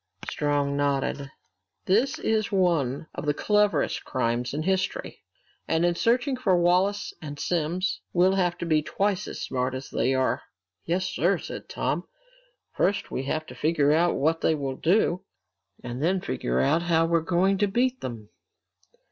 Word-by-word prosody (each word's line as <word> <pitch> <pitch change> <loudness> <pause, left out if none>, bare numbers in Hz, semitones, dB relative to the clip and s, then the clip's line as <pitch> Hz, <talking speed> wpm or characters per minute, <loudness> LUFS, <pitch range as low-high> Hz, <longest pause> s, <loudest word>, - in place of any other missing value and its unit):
Strong 145 -1 0
nodded. 140 0 -1 0.6
"This 230 +8 +2
is 220 -1 0
one 165 -8 +1
of - - -6
the 145 - +2
cleverest 210 +2 +1
crimes 120 -1 -1
in 150 +2 -3
history. 190 - -2 0.5
And 165 +1 +2
in 175 - +3
searching 245 - +1
for 205 -8 +2
Wallace 180 +4 +2
and 145 -2 -7
Simms, 175 +2 -1
we'll 185 +2 +4
have 180 -2 +1
to 170 - -4
be 155 -2 +3
twice 195 +4 -1
as - - -6
smart 130 0 -1
as 130 +1 -7
they 130 +3 +1
are!" 130 0 +1 0.4
"Yes, 180 +3 0
sir," 185 0 +1
said - - -8
Tom. - - -2 0.7
"First 200 - 0
we 135 - -3
have 155 +3 -2
to - - -10
figure 150 -2 +2
out 170 +3 +3
what 160 +3 +1
they 160 - +3
will 135 -3 -3
do, 180 0 +2 0.6
and 120 +2 -5
then 185 +5 +2
figure 60 - -2
out 160 - +3
how 165 -1 +2
we're 165 0 +2
going 185 +4 +2
to 205 - +3
beat 250 +5 0
them!" 115 -4 -6
170 Hz, 165 wpm, -26 LUFS, 145-190 Hz, 0.7 s, we'll